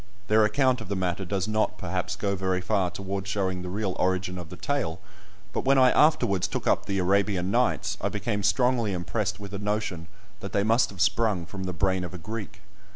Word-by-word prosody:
Their 110 +1 +5
account 130 +2 +2
of 105 - -8
the 100 - -1
matter 95 0 -1
does 95 +2 -1
not, 110 0 0
perhaps, 90 0 -3
go 100 0 -1
very 95 -1 0
far 95 0 +1
towards 95 +1 -4
showing 95 -3 -1
the 90 - -5
real 95 0 -2
origin 90 0 0
of 85 -2 -8
the 90 - -8
tale; 90 - -2 0.5
but - - -1
when 135 +1 +4
I 130 -1 +6
afterwards 100 - +3
took - - -4
up - - +2
the 100 - -1
"Arabian 95 0 +1
Nights," 105 -4 +1
I 100 - 0
became 105 +1 -2
strongly 115 +2 +2
impressed 95 +4 -2
with 100 0 -8
a 100 - -3
notion 105 -5 -2 0.3
that 100 -2 -7
they 100 - +2
must 115 +2 +3
have 95 -2 -7
sprung 100 -3 +2
from 95 +2 -6
the 90 - -2
brain 95 +2 +1
of 90 +1 -6
a - - -5
Greek. 105 +2 -7
100 Hz, 215 wpm, -27 LUFS, 90-105 Hz, 0.5 s, I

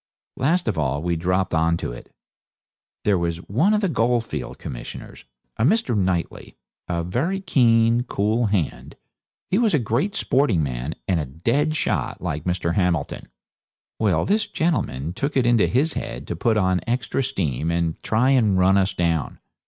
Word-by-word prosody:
Last 165 +5 +1
of 100 -7 0
all 70 0 -1
we 85 0 0
dropped 90 +3 0
on 80 +1 +2
to - - -4
it. - - -11 0.9
There 100 -3 +2
was 85 -1 -1
one 135 - +2
of 215 -1 +2
the 200 - +2
goldfields 115 - -1
commissioners, - - -8 0.3
a - - 0
Mr. 150 - +2
Knightley, 90 -4 -2 0.3
a 85 -1 -1
very 135 - -1
keen, 115 -9 +3
cool 110 +2 0
hand; 95 -8 -2 0.6
he 190 - +3
was 225 -7 +3
a - - +4
great 135 - -1
sporting 135 - +2
man, 65 +3 -4
and 90 -3 +1
a 75 - -3
dead 120 - 0
shot, - - -1
like 75 +1 -4
Mr. 90 -2 -1
Hamilton. 85 -5 -1 0.7
Well, 105 -4 +2
this 210 +2 +1
gentleman 85 - -1
took 140 +9 -2
it 130 - +3
into 120 -2 +4
his 145 +7 +1
head - - -5
to - - -2
put 115 -2 +1
on 95 -3 +2
extra 120 +2 -1
steam 80 - -2
and 85 -1 -1
try 125 +5 +2
and 110 -8 +3
run 95 +2 +4
us 95 +1 0
down. 85 -3 -1
100 Hz, 170 wpm, -23 LUFS, 85-130 Hz, 0.9 s, a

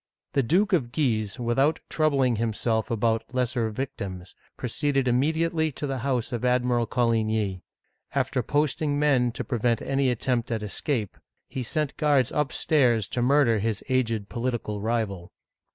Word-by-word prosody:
The 140 - +3
Duke 190 - +2
of 130 -9 +1
Guise, 110 -9 0
without 135 +6 +2
troubling 135 -6 +2
himself 110 0 0
about 115 0 +1
lesser 125 -2 0
victims, 100 -6 -5 0.2
proceeded 135 +2 0
immediately 160 +5 +1
to 145 - -4
the 135 -2 -2
house 125 -2 -1
of 120 -1 -3
Ad 125 0 +3
miral 120 -2 +1
Coligny. 110 -5 0 0.5
After 135 -1 +1
posting 145 +3 0
men 135 -5 +3
to - - -4
prevent 120 -2 0
any 135 -1 0
attempt 125 0 -1
at 110 -2 -1
escape, 105 0 -3 0.3
he 130 - -5
sent 145 +4 -2
guards 145 -5 +3
upstairs 130 -6 +2
to 120 - -2
murder 125 -3 +4
his 110 0 -2
aged 115 -5 0
political 115 -4 -3
rival. 105 -5 -2
125 Hz, 145 wpm, -26 LUFS, 115-140 Hz, 0.5 s, murder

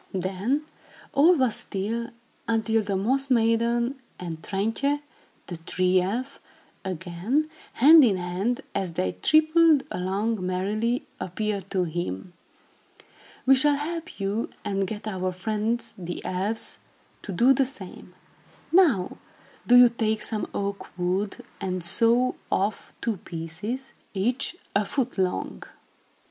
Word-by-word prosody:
Then, 195 - -1 0.5
all 320 +6 +6
was 255 -7 +1
still, 225 +4 -3 0.4
until 225 0 +2
the 200 -2 -2
Moss 265 +7 +1
Maiden 235 +2 +2 0.2
and 165 -3 -6
Trintje, 225 - 0 0.5
the 175 - -6
Tree 185 +2 +2
Elf, 245 +9 -3 0.4
again, 190 - -2 0.2
hand 305 +5 +8
in 210 -7 +4
hand, 185 +7 -1
as 185 -3 -2
they 95 - 0
tripped 310 - +4
along 195 +3 -1
merrily, 210 +7 -1
appeared 200 +1 -3
to 185 -2 +1
him. 175 - -4 1.1
"We 265 - +7
shall 285 +2 +4
help 330 +2 -5
you 200 +3 -1 0.2
and 195 -1 0
get 215 +2 -6
our 185 -3 -2
friends, 215 +5 -2
the 175 -2 -6
elves, 195 +5 -1 0.4
to 200 - -6
do 240 +9 +5
the 270 +1 +2
same. 190 -8 -10 0.6
Now, 305 - +3 0.5
do 245 - +7
you 245 -1 +9
take 220 -2 -1
some 215 -1 -1
oak 200 -2 -4
wood 185 +3 -1
and 185 -2 -3
saw 235 +7 +3 0.2
off 200 +3 -1
two 225 -3 -1
pieces, 175 +11 -6 0.2
each 245 - 0 0.2
a 200 - +4
foot 245 +1 -2
long. 185 -1 -1
215 Hz, 125 wpm, -26 LUFS, 185-250 Hz, 1.1 s, you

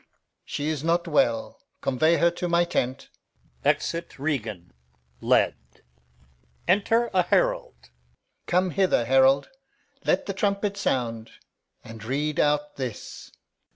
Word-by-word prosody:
Alb. - - -36 0.4
She 145 +1 -3
is 155 -2 -3
not 170 +1 +1
well. 120 -8 +1 0.2
Convey 155 +6 +2
her 170 - +3
to 175 +1 -4
my 170 0 +4
tent. 130 -6 -2 0.5
[Exit 170 0 -1
Regan, 110 - -3 0.5
led.] - - +3 1.1
Enter 225 +4 +2
a 185 - +4
Herald. 60 - 0 0.6
Come 180 +1 +2
hither, 185 -10 +2
herald. 135 +2 +4 0.5
Let - - +1
the - - -3
trumpet 200 -1 -1
sound, 115 - -2 0.5
And 115 -1 -10
read 145 +5 -2
out 150 0 +1
this. 125 -6 -6
150 Hz, 120 wpm, -25 LUFS, 125-175 Hz, 1.1 s, my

